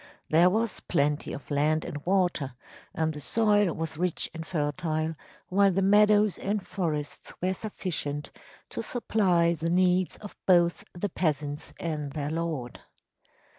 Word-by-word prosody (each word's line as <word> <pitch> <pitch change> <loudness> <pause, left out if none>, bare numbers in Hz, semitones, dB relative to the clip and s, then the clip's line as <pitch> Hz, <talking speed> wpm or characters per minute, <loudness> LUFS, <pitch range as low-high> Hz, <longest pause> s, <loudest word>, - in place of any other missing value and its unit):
There 170 +3 +6
was 220 +3 0
plenty 145 -2 0
of 145 - -8
land 155 +2 +2
and 145 0 -6
water 175 -9 +1 0.4
and 160 0 -1
the 150 - -8
soil 205 -1 +3
was 160 -1 -4
rich 180 -1 -1
and 165 -1 -5
fertile, 155 0 -1 0.4
while 195 +1 +4
the 190 +1 +1
meadows 210 0 +5
and 200 -1 -2
forests 155 -6 -3
were 185 +1 0
sufficient 160 -8 -4 0.4
to - - -3
supply 185 -8 +2
the 165 0 -2
needs 180 +1 +2
of 210 - -10
both 175 -2 +4
the 190 +3 -2
peasants 150 -4 -2
and 150 -4 -3
their 150 -1 -3
lord. 160 -7 -3
170 Hz, 140 wpm, -28 LUFS, 150-190 Hz, 0.4 s, There